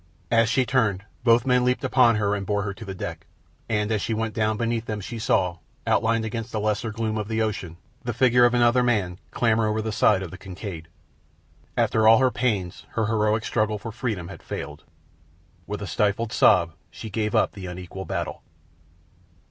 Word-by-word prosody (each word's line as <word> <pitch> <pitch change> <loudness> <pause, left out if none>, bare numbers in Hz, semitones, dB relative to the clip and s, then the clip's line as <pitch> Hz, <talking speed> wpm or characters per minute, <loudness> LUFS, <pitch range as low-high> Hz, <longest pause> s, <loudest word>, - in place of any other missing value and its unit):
As 115 -1 +4
she 130 +1 +2
turned, 110 -7 +1 0.2
both 120 +1 +4
men 125 -1 +3
leaped 125 +2 +1
upon 125 -3 +4
her 100 -1 +1
and 100 -1 -2
bore 105 +1 -1
her 100 -1 -3
to 105 - -10
the 95 -1 -6
deck, - - -6 0.4
and 105 -1 0
as 110 -2 +1
she 110 - -1
went 110 0 -2
down 110 -1 0
beneath 115 0 -1
them 105 -2 -3
she 115 +3 -6
saw, 90 -5 +1 0.3
outlined 115 0 +2
against 115 0 -4
the 110 - -2
lesser 105 +2 -1
gloom 110 0 -2
of 105 - -4
the 110 0 -2
ocean, 95 -6 -4 0.3
the 120 - -2
figure 120 +1 +4
of 120 0 +4
another 120 +1 +4
man 100 -7 0
clamber 115 -2 +2
over 110 +1 0
the 110 0 -2
side 100 -2 +3
of 90 - -7
the 95 - -10
Kincaid. 95 -4 -7 0.9
After 110 0 +3
all 115 0 +8
her 130 -1 +3
pains 105 -9 -2
her 115 - 0
heroic 110 0 +1
struggle 110 -2 0
for 115 +2 -7
freedom 110 -7 -3
had - - -10
failed. - - -7 0.8
With - - -4
a - - -3
stifled 105 +2 0
sob 85 -5 +4 0.2
she 110 - -9
gave 105 +1 -1
up - - +3
the 95 -2 -8
unequal 90 +1 -7
battle. 85 -3 -4
110 Hz, 195 wpm, -24 LUFS, 100-115 Hz, 0.9 s, all